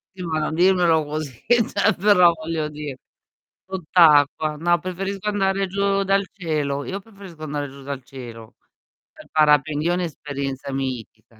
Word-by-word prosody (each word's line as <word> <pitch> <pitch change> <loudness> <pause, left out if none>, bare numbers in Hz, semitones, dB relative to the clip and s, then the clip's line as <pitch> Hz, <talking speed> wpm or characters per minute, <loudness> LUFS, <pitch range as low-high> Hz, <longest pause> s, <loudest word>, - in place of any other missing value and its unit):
Sì, 185 - -7
ma 160 -2 -1
non 155 +1 -2
dirmelo 175 -2 +3
così, 145 -4 -6
cioè 220 -2 +2
però, 180 -4 +6
voglio 160 -1 -3
di 150 -2 -6 0.7
sott'acqua. 155 -4 +3
No, 175 +2 +2
preferisco 195 +2 -4
andare 195 -1 +1
giù 195 +1 0
dal 195 +1 +2
cielo. 150 -6 -2
Io 195 +1 -4
preferisco 195 -6 -13
andare 145 -1 -3
giù 140 +1 -13
dal 135 -1 -6
cielo, 120 -4 -11 0.6
pe - - -16
parapendio 150 +1 +3
è - - +1
un'esperienza 140 -5 -4
mitica, 125 -4 -6
160 Hz, 140 wpm, -22 LUFS, 145-190 Hz, 0.7 s, però